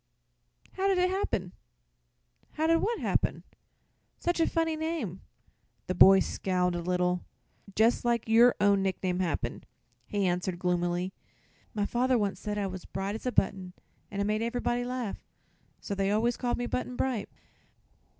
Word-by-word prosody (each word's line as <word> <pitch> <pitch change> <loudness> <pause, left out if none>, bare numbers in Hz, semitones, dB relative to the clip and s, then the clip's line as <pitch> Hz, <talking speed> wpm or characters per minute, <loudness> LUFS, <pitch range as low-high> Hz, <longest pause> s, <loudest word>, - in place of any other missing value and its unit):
"How 385 +1 -1
did 390 -1 +3
it 365 0 +2
happen?" 195 - -1 1.0
"How 310 - -1
did 330 +1 +4
what 460 +2 0
happen?" - - 0 0.7
"Such 345 0 -1
a 325 - +3
funny 325 -1 0
name." 310 - -3 0.6
The 185 - -2
boy 190 +1 +8
scowled 180 -2 0
a 175 - -2
little. 180 0 0 0.5
"Just 225 +3 +3
like 235 -2 0
your 235 +2 +6
own 200 -1 +4
nickname 185 -1 -1
happened," 150 -9 -2 0.4
he 205 -2 0
answered 180 0 -1
gloomily. 175 +1 -1 0.6
"My 205 -1 +1
father 250 +3 +2
once 205 -3 -1
said 210 -1 -3
I 205 - 0
was 185 -1 -5
bright 195 +1 -4
as 220 +4 -5
a - - +1
button, 190 -4 0 0.4
an' 200 - -5
it - - +2
made 215 +1 0
ever'body 240 +1 -1
laugh. 250 -4 -4 0.6
So 205 - -5
they 195 0 0
always 225 +3 +2
call 245 -1 -1
me 245 - -3
Button 250 +1 -3
Bright." 250 -4 -1
205 Hz, 160 wpm, -29 LUFS, 185-245 Hz, 1.0 s, boy